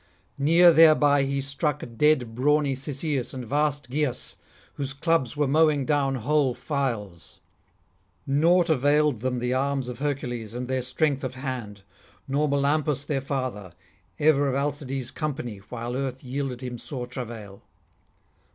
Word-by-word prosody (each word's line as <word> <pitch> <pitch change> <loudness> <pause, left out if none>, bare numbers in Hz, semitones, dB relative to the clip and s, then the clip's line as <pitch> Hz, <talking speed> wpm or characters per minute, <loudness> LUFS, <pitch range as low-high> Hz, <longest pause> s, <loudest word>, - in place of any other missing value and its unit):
Near 170 +5 +6
thereby 155 -3 +6
he 140 0 -1
struck 140 +1 -1
dead 130 -4 +2
brawny 145 +3 +2
Cisseus 135 0 -3
and 130 -2 -5
vast 145 +1 -1
Gyas, 145 -3 -2 0.4
whose 140 -1 -4
clubs 150 -3 0
were 145 -1 +2
mowing 150 -1 +3
down 140 -2 +1
whole 135 +1 +1
files: 115 - -4 0.9
naught 165 +5 +3
availed 150 -3 +2
them 125 +2 -1
the 125 +1 -1
arms 135 -1 -1
of 125 - -7
Hercules 120 -6 -3
and 125 0 -4
their 130 0 -1
strength 135 +2 0
of 130 -1 -4
hand, 125 -7 -6 0.4
nor 145 +2 +1
Melampus 140 0 +1
their 140 -2 -1
father, 130 -9 -4 0.4
ever 145 -2 +3
of 135 - 0
Alcides' 140 -2 -2
company 135 -9 -4
while 120 0 -4
earth 130 -1 -3
yielded 130 -1 -4
him 125 -2 -6
sore 125 -1 -4
travail. 115 -5 -8
135 Hz, 140 wpm, -25 LUFS, 125-150 Hz, 0.9 s, Near